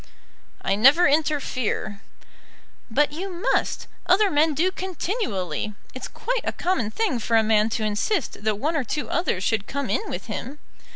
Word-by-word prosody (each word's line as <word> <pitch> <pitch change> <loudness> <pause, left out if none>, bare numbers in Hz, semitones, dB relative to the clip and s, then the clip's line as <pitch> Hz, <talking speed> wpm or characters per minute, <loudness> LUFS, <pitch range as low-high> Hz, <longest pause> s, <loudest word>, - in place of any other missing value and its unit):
"I 195 - +1
never 270 - +6
interfere." 275 -8 0 0.9
"But 290 +6 +2
you 370 +6 -4
must. 365 +7 0 0.2
Other 385 +2 +4
men 300 +1 +3
do 355 +6 +2
continually. 345 - -3 0.2
It's 255 - -6
quite - - -2
a - - -1
common 345 - 0
thing 320 - 0
for 230 +1 +2
a 220 - +5
man 215 0 +3
to 225 -1 -2
insist 215 - -1
that 215 -1 +1
one 305 +9 -1
or 295 - +1
two 295 +5 -3
others 270 - 0
should 215 -1 0
come 280 -1 -3
in 435 - -1
with - - -5
him." 280 +3 -5
285 Hz, 165 wpm, -24 LUFS, 220-355 Hz, 0.9 s, never